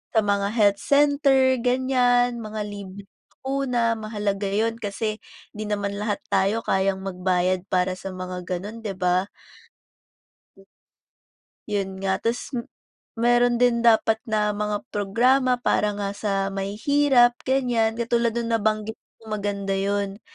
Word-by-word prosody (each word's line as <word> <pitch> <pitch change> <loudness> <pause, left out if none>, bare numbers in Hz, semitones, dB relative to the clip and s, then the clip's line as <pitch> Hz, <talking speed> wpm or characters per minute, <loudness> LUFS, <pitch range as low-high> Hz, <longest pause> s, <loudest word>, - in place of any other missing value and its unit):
sa 220 - +5
mga 200 0 +1
health 205 -3 +3
center, 280 -2 +3
ganiyan, 245 -1 +2
mga 215 -1 -5
libreng 200 -1 -9 0.3
bakuna. 255 -4 0
Mahalaga 205 -2 -2
yun 220 +3 0
kasi 215 +1 -3 0.4
di 215 +1 -5
naman 200 -1 -2
lahat 210 -1 -2
tayo 200 +3 +2
kayang 190 0 +1
magbayad 185 -1 0
para 185 0 +1
sa 195 - -6
mga 185 0 -6
ganun, 200 +5 -5
'di 200 -3 -4
ba? 180 +1 +1 2.4
'Yon 200 -2 -1
nga. 190 -1 0
Tas 230 +2 -2
m 235 - -4 0.5
meron 240 +1 +3
din 245 -1 +3
dapat 220 -1 +4
na 210 -1 +1
mga 210 0 -2
programa 250 +6 +2
para 210 -3 +1
nga 200 -1 -2
sa 205 0 -2 0.2
mahihirap, 240 +5 +2
ganiyan 245 -4 +1
katulad 235 0 +1
nung 235 0 -2
nabanggit 215 0 -1 0.2
mo 220 -1 -5
maganda 200 -1 -3
'yon. 200 +1 -2
215 Hz, 130 wpm, -24 LUFS, 200-240 Hz, 2.4 s, sa